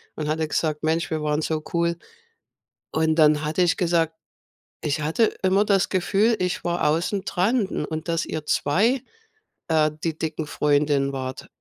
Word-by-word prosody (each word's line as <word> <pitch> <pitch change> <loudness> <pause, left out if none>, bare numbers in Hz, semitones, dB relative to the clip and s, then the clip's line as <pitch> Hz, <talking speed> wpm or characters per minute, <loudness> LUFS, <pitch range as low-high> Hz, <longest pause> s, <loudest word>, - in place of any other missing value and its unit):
und 150 -1 -4
hatte 155 0 0
gesagt: 155 -1 -1
„Mensch, 160 +1 0
wir 155 -1 -1
waren 150 +1 0
so 155 -1 -2
cool.“ 170 0 +1 0.9
Und 160 0 +1
dann 150 -1 +4
hatte 155 +4 +1
ich 175 - +2
gesagt: 165 -2 +1 0.7
„Ich 150 0 -1
hatte 165 +9 +1
immer 190 +2 +3
das 200 -2 +2
Gefühl, 200 +5 +2
ich 180 -1 -2
war 175 -2 0
außen 175 +5 0
dran 205 +5 +1
u 150 - -3
und 160 +1 -5
dass 165 -1 0
ihr 155 -1 -5
2, 220 - +2 0.7
äh, 155 -1 +3
die 165 -2 -1
dicken 160 -1 -3
Freundinnen 145 -2 +1
wart.“ 130 -1 -5
160 Hz, 165 wpm, -24 LUFS, 150-180 Hz, 0.9 s, dann